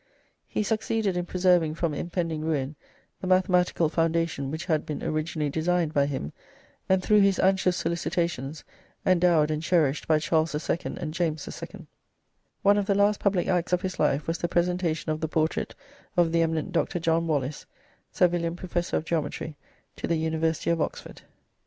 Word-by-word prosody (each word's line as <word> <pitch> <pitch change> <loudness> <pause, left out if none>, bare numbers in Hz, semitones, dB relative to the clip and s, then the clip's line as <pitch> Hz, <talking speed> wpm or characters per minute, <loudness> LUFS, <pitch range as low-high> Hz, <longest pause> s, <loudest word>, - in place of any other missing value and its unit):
He - - -1
succeeded 220 -2 0
in 175 0 -2
preserving 180 -4 +2
from 165 -2 -1
impending 165 0 -2
ruin 150 -2 -1 0.5
the 185 - -4
mathematical 180 -2 +3
foundation 165 -3 0
which 160 +4 -4
had 160 -4 +1
been 150 - -5
originally 155 -2 -1
designed 165 +1 0
by 140 -1 +3
him, 130 - -4 0.6
and 190 -1 +3
through 210 +2 +5
his 195 -1 +4
anxious 190 -2 +2
solicitations 170 -4 -2 0.4
endowed 170 -4 +4
and 155 0 -1
cherished 160 -4 +1
by 155 - +4
Charles 155 0 +1
II. 160 +3 -2
and 155 -1 -4
James 160 -3 -1
II. - - -8 0.8
One 205 +1 +5
of 200 - -2
the 200 - +2
last 205 +1 +3
public 195 -3 +1
acts 180 -1 0
of 180 - +2
his 185 -1 -4
life 145 -1 +2
was 165 +1 -2
the 170 - 0
presentation 175 -2 0
of 155 +1 -3
the 160 - 0
portrait 160 0 -1 0.4
of 170 -2 +4
the 165 0 +3
eminent 160 +2 0
Dr. 180 +1 0
John 165 0 +1
Wallis, 145 -2 -2 0.4
Savilian 170 -1 +1
Professor 175 -1 -2
of 155 - -4
Geometry, 155 -1 -2 0.4
to - - -3
the 170 - +1
University 160 +1 0
of 165 -1 0
Oxford. - - -5
165 Hz, 170 wpm, -26 LUFS, 155-180 Hz, 0.8 s, through